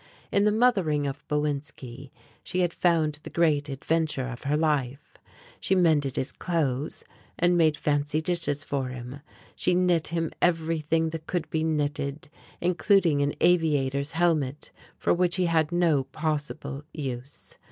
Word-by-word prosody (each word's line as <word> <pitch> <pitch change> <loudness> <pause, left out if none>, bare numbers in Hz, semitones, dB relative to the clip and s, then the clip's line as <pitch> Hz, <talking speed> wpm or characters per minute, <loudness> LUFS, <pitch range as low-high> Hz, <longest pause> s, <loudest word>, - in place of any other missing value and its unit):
In 200 +1 +3
the 210 - +4
mothering 195 -11 +2
of 140 -1 -4
Bowinski 145 -3 -3 0.3
she 185 +1 -1
had 175 -1 +1
found 160 -4 +1
the - - -9
great 150 -4 +1
adventure 145 -1 -1
of 120 +1 -8
her 145 +2 +1
life. 145 -4 -1 0.5
She 190 - +1
mended 155 -7 +2
his 130 - -2
clothes, 150 -5 -2 0.3
and 175 +1 +3
made 160 -3 +3
fancy 145 +1 0
dishes 155 -4 -1
for 140 -2 -2
him, 125 +2 -7 0.4
she 180 - +2
knit 180 -3 +2
him 165 -1 -2
everything 165 -1 +1
that 160 -1 -7
could 175 -3 -2
be 160 -1 0
knitted, 145 -2 -2 0.3
including 175 -3 +3
an 145 +1 0
aviator's 145 -4 +2
helmet 155 -5 0 0.3
for - - +2
which 175 0 +2
he 185 - +2
had 160 -2 +1
no 165 -6 +2
possible 145 -1 -3
use. 135 -2 -7
155 Hz, 145 wpm, -26 LUFS, 145-170 Hz, 0.5 s, the